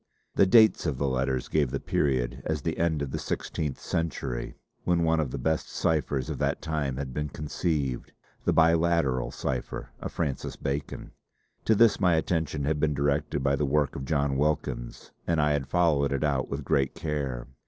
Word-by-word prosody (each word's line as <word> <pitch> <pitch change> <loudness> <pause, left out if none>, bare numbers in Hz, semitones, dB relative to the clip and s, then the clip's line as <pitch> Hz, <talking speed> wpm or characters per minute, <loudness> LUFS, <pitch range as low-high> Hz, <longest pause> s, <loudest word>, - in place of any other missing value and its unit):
The 95 - +4
dates 110 -4 +6
of 70 -5 -1
the 70 - 0
letters 65 -1 0
gave 75 -4 +1
the - - -2
period 65 -2 0
as 75 -3 -2
the - - -2
end 80 -3 +1
of 70 - -5
the - - -3
sixteenth 75 -4 -3
century, 70 -7 -3 0.3
when 85 -1 +2
one 80 0 +2
of 75 -4 0
the 70 - -4
best 80 +5 -1
ciphers 75 -5 0
of - - -4
that - - 0
time 75 -5 -2
had 70 -2 -4
been 75 +2 -2
conceived, 75 -2 -2 0.3
the - - +2
"Biliteral 80 -5 +3
Cipher" 65 -2 -4
of - - -5
Francis 75 -6 -3
Bacon. 70 +1 -4 0.5
To 110 - +4
this 115 +1 +5
my 90 -4 +4
attention 80 -3 -1
had 75 +1 0
been 75 -1 +1
directed 70 0 0
by 70 0 +3
the 75 - -1
work 75 0 +1
of 65 - -5
John 70 -2 +1
Wilkins 75 -4 -2 0.2
and 85 -2 +2
I 75 0 +3
had 70 -2 0
followed 80 -6 +2
it 70 0 0
out 70 -3 0
with 70 0 -4
great 70 +1 +1
care. 70 -6 -3
75 Hz, 185 wpm, -27 LUFS, 65-80 Hz, 0.5 s, dates